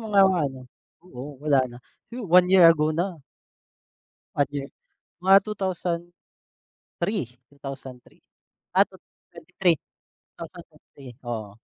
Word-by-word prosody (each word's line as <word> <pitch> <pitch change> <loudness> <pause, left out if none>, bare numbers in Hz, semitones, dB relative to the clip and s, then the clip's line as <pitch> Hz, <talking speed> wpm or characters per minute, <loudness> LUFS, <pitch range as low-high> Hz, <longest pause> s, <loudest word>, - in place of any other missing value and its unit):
mga 205 -3 +4
ano 140 -9 -1 0.4
oo, 140 -4 -9
wala 145 -2 +3
na. 120 - -11 0.3
Huh, 240 0 -6
1 180 +1 +6
year 185 -3 +8
ago 155 -2 +5
na. 170 +1 -2 1.2
1 145 - +3
year 140 -1 -3 0.5
mga 190 +1 +7
2003. 175 - -5
2003? 135 -3 -10 0.5
Ah, - - +7
2023, 180 0 -3 0.6
2023, 135 -3 -12
oo. 110 -3 -4
165 Hz, 100 wpm, -25 LUFS, 135-185 Hz, 1.2 s, year